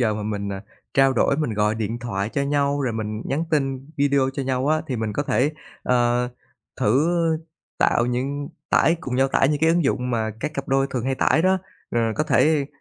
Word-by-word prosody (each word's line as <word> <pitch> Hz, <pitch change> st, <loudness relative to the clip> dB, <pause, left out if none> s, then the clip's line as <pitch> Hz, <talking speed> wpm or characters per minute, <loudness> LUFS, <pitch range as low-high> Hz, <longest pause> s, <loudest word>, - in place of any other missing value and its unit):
giờ 110 Hz, -3 st, +2 dB
mà 105 Hz, -, -4 dB
mình, 100 Hz, -1 st, -3 dB
ờ, 95 Hz, -1 st, -4 dB, 0.3 s
trao 135 Hz, 0 st, +5 dB
đổi, 135 Hz, +3 st, +2 dB
mình 150 Hz, -9 st, -1 dB
gọi 105 Hz, +1 st, +1 dB
điện 110 Hz, +1 st, -3 dB
thoại 105 Hz, -4 st, -3 dB
cho 140 Hz, -, 0 dB
nhau, 140 Hz, 0 st, +1 dB
rồi 125 Hz, -4 st, 0 dB
mình 110 Hz, 0 st, -4 dB
nhắn 150 Hz, +5 st, -1 dB
tin 135 Hz, -2 st, -1 dB
video 140 Hz, -1 st, +2 dB
cho 135 Hz, -, -3 dB
nhau 130 Hz, 0 st, -1 dB
á 155 Hz, 0 st, +2 dB
thì 130 Hz, -, -1 dB
mình 110 Hz, -1 st, -2 dB
có 145 Hz, -, -1 dB
thể, 145 Hz, +1 st, +1 dB, 0.3 s
ờ, 125 Hz, 0 st, +2 dB, 0.5 s
thử 130 Hz, +10 st, +3 dB, 0.7 s
tạo 120 Hz, -, +3 dB
những 135 Hz, +4 st, -2 dB, 0.2 s
tải 165 Hz, -, +4 dB
cùng 130 Hz, -7 st, -4 dB
nhau 135 Hz, +1 st, +3 dB
tải 135 Hz, -, +3 dB
những 150 Hz, -1 st, 0 dB
cái 160 Hz, -, +4 dB
ứng 170 Hz, -2 st, +2 dB
dụng 125 Hz, -2 st, 0 dB
mà 110 Hz, -2 st, 0 dB
các 150 Hz, +1 st, -3 dB
cặp 135 Hz, -, -4 dB
đôi 135 Hz, 0 st, +2 dB
thường 125 Hz, -2 st, -2 dB
hay 135 Hz, 0 st, 0 dB
tải 160 Hz, +4 st, +2 dB
đó. 190 Hz, 0 st, +3 dB, 0.3 s
Ờ, 120 Hz, -, +1 dB
có 155 Hz, -, 0 dB
thể, 150 Hz, -3 st, +3 dB
135 Hz, 220 wpm, -23 LUFS, 115-145 Hz, 0.7 s, trao